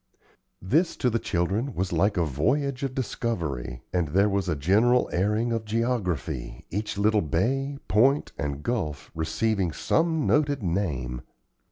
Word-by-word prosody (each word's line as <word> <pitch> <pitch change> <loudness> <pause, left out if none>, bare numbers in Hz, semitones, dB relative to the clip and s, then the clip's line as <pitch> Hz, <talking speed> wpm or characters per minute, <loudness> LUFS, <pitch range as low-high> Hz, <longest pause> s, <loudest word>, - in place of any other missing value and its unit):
This, 155 - +2
to 125 - +1
the 115 - +1
children, 105 +9 -1
was 90 0 -1
like 95 +5 +2
a 85 - +2
voyage 130 - 0
of 135 -2 -3
discovery, 80 - -3
and 90 -3 +1
there 100 +7 +3
was 100 -2 0
a 80 - +1
general 105 - +3
airing 105 +6 +1
of 115 -1 -1
geography, 105 - -2
each 105 +2 -3
little 105 +1 +3
bay, 135 - 0
point, 135 +7 +3
and 70 0 -4
gulf 75 - -3
receiving 90 +4 0
some 160 - +1
noted 145 -4 +2
name. 75 -10 -2
100 Hz, 145 wpm, -26 LUFS, 80-120 Hz, -, there